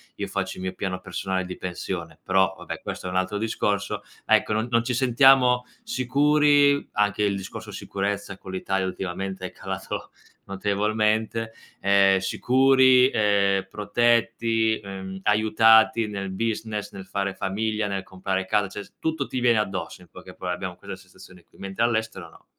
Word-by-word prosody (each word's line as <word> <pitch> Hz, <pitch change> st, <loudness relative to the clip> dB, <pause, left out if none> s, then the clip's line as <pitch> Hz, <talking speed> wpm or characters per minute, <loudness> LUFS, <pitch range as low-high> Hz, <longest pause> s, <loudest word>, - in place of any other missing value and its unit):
io -, -, -4 dB
faccio -, -, -3 dB
il 95 Hz, -, -7 dB
mio 95 Hz, 0 st, -3 dB
piano 95 Hz, -1 st, -4 dB
personale 95 Hz, 0 st, -3 dB
di 90 Hz, 0 st, -7 dB
pensione, 85 Hz, -2 st, -5 dB
però 95 Hz, -1 st, +2 dB
vabbè -, -, -7 dB
questo -, -, -6 dB
è -, -, -3 dB
un 90 Hz, -, -2 dB
altro 95 Hz, +2 st, -1 dB
discorso. 100 Hz, -2 st, -1 dB, 0.2 s
Ecco 110 Hz, -, +3 dB
non-non 115 Hz, +2 st, +1 dB
ci 125 Hz, +1 st, -2 dB
sentiamo 125 Hz, 0 st, +4 dB, 0.2 s
sicuri, 145 Hz, -, +3 dB
anche 105 Hz, 0 st, +1 dB
il 100 Hz, -1 st, +1 dB
discorso 105 Hz, +2 st, -7 dB
sicurezza 100 Hz, 0 st, -4 dB
con 95 Hz, -, -10 dB
l'Italia 95 Hz, 0 st, -1 dB
ultimamente 95 Hz, 0 st, -4 dB
è -, -, -12 dB
calato -, -, -6 dB, 0.4 s
notevolmente, 110 Hz, +3 st, 0 dB, 0.3 s
ehm, 100 Hz, -1 st, +4 dB
sicuri, 130 Hz, +4 st, +4 dB
ehm, 100 Hz, -3 st, +2 dB
protetti, 115 Hz, +1 st, +1 dB
ehm, 95 Hz, -1 st, -8 dB
aiutati 110 Hz, +1 st, +4 dB
nel 100 Hz, -2 st, -5 dB
business 110 Hz, +1 st, -3 dB
nel 95 Hz, -1 st, -10 dB
fare 100 Hz, -1 st, -2 dB
famiglia, 105 Hz, +2 st, -2 dB
nel 95 Hz, -1 st, -3 dB
comprare 95 Hz, 0 st, -3 dB
casa, 105 Hz, +1 st, +1 dB
cioè 100 Hz, +2 st, -7 dB
s -, -, -20 dB
tutto 160 Hz, -3 st, -1 dB
ti 130 Hz, -, -4 dB
viene 120 Hz, -2 st, +3 dB
addosso 95 Hz, -3 st, -3 dB
in -, -, -19 dB
poche 75 Hz, -, -13 dB
parole, 90 Hz, -1 st, -3 dB
abbiamo 90 Hz, 0 st, -5 dB
questa 95 Hz, +1 st, -9 dB
sensazione 90 Hz, -1 st, -16 dB
qui, -, -, -23 dB
mentre 95 Hz, +3 st, -3 dB
all'estero 115 Hz, -1 st, -1 dB
no. -, -, -20 dB
105 Hz, 160 wpm, -24 LUFS, 95-115 Hz, 0.4 s, sentiamo